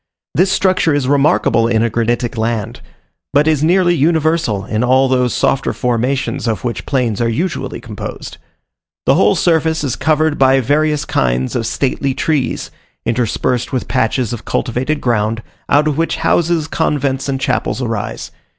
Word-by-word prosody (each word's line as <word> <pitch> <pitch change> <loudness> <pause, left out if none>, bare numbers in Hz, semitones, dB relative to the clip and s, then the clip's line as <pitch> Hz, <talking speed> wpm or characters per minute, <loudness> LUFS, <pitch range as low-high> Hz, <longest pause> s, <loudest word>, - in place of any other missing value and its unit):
This 185 +3 +2
structure 185 -6 +2
is 140 -3 0
remarkable 140 -5 +3
in 115 -1 +2
a 115 - +1
granitic 120 +1 -1
land, 110 -2 -2 0.5
but 145 +2 +3
is 155 -2 +2
nearly 175 +2 +3
universal 160 - +1
in 110 +2 -1
all 130 +2 +3
those 125 -2 +1
softer 135 - 0
formations 125 +2 -1
of 110 -5 -2
which 115 -6 -4
plains 120 -6 0
are 115 - +1
usually 155 +6 -3
composed. - - -8 0.7
The - - +4
whole 105 +1 +3
surface 160 -2 +1
is 135 -5 -1
covered 155 +1 +1
by 135 0 +5
various 150 +3 +1
kinds 65 +1 0
of 115 -2 -1
stately 135 0 -1
trees, 145 -5 -1 0.3
interspersed 120 +1 -1
with 130 - -2
patches 120 -1 0
of 120 - -6
cultivated 130 +5 -2
ground, 115 -1 0 0.3
out 150 +2 +4
of 150 0 -1
which 165 - 0
houses, 170 -2 +1
convents, 140 -4 -1
and 135 -1 -1
chapels 125 -4 -1
arise. 115 -4 -4
130 Hz, 155 wpm, -16 LUFS, 115-155 Hz, 0.7 s, by